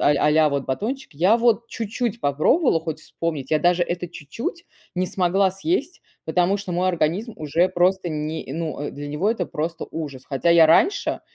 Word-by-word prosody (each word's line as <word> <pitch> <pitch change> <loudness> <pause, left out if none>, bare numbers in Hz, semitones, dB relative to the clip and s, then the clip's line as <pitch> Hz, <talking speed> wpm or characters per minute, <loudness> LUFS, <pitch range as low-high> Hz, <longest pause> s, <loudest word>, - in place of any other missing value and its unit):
а - - +4
а-ля 150 +1 +4
вот 140 -1 -2
батончик, 215 - -4
я 185 +10 +4
вот 235 0 +2
чуть-чуть 230 +1 -3
попробовала 160 - +2
хоть 160 -2 -5
вспомнить, 160 -4 -4
я 155 - +3
даже 175 +1 +3
это 175 0 -4
чуть-чуть 230 - -6 0.3
не 185 0 +1
смогла 190 +2 +2
съесть, 325 - -2 0.2
потому 180 +4 +2
что 195 -3 -6
мой 180 +2 +1
организм 180 +7 0
уже 160 +4 +1
просто 180 0 +1
не 155 -2 -4
ну, 160 -2 -4
э, 145 - -3
для 145 +1 -7
него 165 +9 0
это 190 -7 -2
просто 160 +2 -4
ужас. 140 -5 -6
Хотя 140 +4 0
я 170 -1 +7
раньше 370 - +3
175 Hz, 180 wpm, -23 LUFS, 155-200 Hz, 0.3 s, я